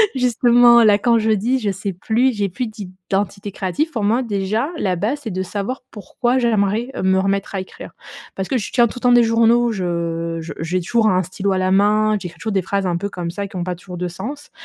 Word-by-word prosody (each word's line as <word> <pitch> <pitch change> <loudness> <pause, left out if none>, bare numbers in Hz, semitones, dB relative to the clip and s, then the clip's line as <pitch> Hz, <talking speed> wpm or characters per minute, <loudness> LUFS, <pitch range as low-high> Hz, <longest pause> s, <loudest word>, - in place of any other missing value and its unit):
Justement, 240 -1 +5
là, 210 -2 +5
quand 230 +2 +2
je 220 0 +1
dis: 235 +6 +1
«Je 210 -4 -1
sais 195 0 -4
plus, 235 +8 +1
j'ai 205 -2 -1
plus 245 +7 -3
d'identité 195 0 -4
créative.» 195 - -2
pour 225 -8 -3
moi, 230 +5 +2
déjà, 215 +4 -1
la 190 -10 0
base, 230 +11 -2
c'est 225 - -4
de 185 +1 -2
savoir 205 +7 -4
pourquoi 240 +4 -2
j'aimerais 225 0 +1
me 190 0 +3
remettre 195 +1 -1
à - - -1
écrire. 190 - -9 0.4
Parce 190 -1 -3
que 265 - 0
je 215 - -4
tiens, 240 -1 +4
tout 245 - -8
le - - -26
temps, 245 - +3
des 240 -1 +6
journaux. 230 +1 +3
Je 170 -3 -2
je 160 - -7
j'ai 165 +3 -1
toujours 225 +5 +1
un 185 -1 +2
stylo 190 +3 -3
à 190 - +1
la 185 0 0
main. 210 +2 +3
J'écris 170 -3 -9
toujours 220 - -3
des 195 - +2
phrases 195 +2 -2
un 175 -1 0
peu 200 +4 -4
comme 175 -3 -5
ça 200 +2 -4
qui 195 - -14
ont 175 - -2
pas 180 0 -3
toujours 180 +1 -10
de 180 +1 -2
sens 240 +13 -7
205 Hz, 240 wpm, -19 LUFS, 185-235 Hz, 0.4 s, des